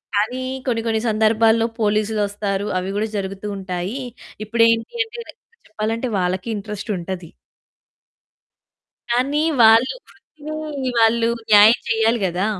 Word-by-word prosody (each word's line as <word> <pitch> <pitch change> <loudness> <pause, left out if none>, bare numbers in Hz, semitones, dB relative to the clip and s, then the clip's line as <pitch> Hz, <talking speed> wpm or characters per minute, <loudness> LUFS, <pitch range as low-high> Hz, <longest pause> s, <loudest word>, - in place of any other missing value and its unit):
కానీ 230 +5 0 0.3
కొన్ని, 230 -2 0
కొన్ని 220 -1 0
సందర్భాల్లో 220 +1 +3
పోలీసులొస్తారు 205 -1 -1
అవి 185 +1 -4
కూడా 215 +1 0
జరుగుతూ 195 +1 -5
ఉంటాయి. 190 +5 -4 0.5
ఇప్పుడేంటి 230 - +2
అంటే 460 +1 -11
రె - - -10 0.4
చెప్పాలంటే, 220 +3 -2
వాళ్ళకి 185 +3 -2
ఇంట్రెస్టుంటది. 195 -4 -5 1.8
కానీ, 270 +5 +1 0.2
వాళ్ళు 225 - +6
వృత్తిని 305 -3 -6
వాళ్ళు 230 0 +3 0.2
న్యాయం 215 +3 +7
చెయ్యాలి 225 +1 +2
కదా! 180 +3 -1
220 Hz, 105 wpm, -20 LUFS, 200-230 Hz, 1.8 s, న్యాయం